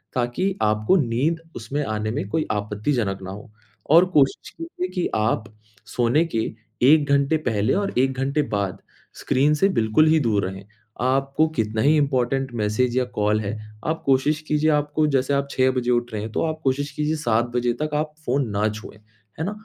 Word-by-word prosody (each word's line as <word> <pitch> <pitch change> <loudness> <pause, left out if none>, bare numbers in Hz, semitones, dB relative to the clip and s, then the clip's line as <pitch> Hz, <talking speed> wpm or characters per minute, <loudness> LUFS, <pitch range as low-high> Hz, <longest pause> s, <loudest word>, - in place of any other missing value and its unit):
ताकि 130 +11 -1
आपको 110 - +2
नींद 140 +5 0 0.2
उसमें 135 +7 -3
आने 110 0 -2
में 100 - -3
कोई 155 +7 -1
आपत्तिजनक 105 0 -2
ना 95 - -6
हो। 105 +2 -10 0.4
और 170 +3 +7
कोशिश 140 -4 +2
कीजिए 330 - -4
कि 180 - 0
आप 110 0 0 0.5
सोने 125 +7 +3
के - - +2 0.4
1 145 +2 +5
घंटे 140 +2 +3
पहले 110 -8 0
और 200 0 -1
1 135 +1 +2
घंटे 140 +3 +1
बाद 100 -2 -2 0.3
स्क्रीन 140 +4 +1
से 190 +6 +3
बिल्कुल 115 +7 +3
ही 160 0 +4
दूर 110 -8 +1
रहें। 95 +1 -7 0.4
आपको 135 +4 +1
कितना 110 -1 0
ही 150 +5 +4
इम्पोर्टेंट 135 -2 0
मैसेज 120 +4 0
या 125 - +2
कॉल 105 +1 +2
है, 105 +1 -4 0.3
आप 160 +1 -1
कोशिश 140 +3 +2
कीजिए 150 +1 +2
आपको 150 +1 +1
जैसे 135 +2 +1
आप 140 0 0
6 130 0 +2
बजे 125 -1 -1
उठ 120 -1 0
रहे 105 - -3
हैं, 110 - -6
तो - - -1
आप 155 -1 -3
कोशिश 140 +2 0
कीजिए 150 +2 -1
7 120 -6 +1
बजे 120 -1 +1
तक 155 - -1
आप 150 0 -1
फ़ोन 130 0 0
ना 105 +1 +2
छुएँ। 105 -1 -9 0.4
है 160 - -1
ना? 195 - -2
130 Hz, 190 wpm, -23 LUFS, 110-150 Hz, 0.5 s, और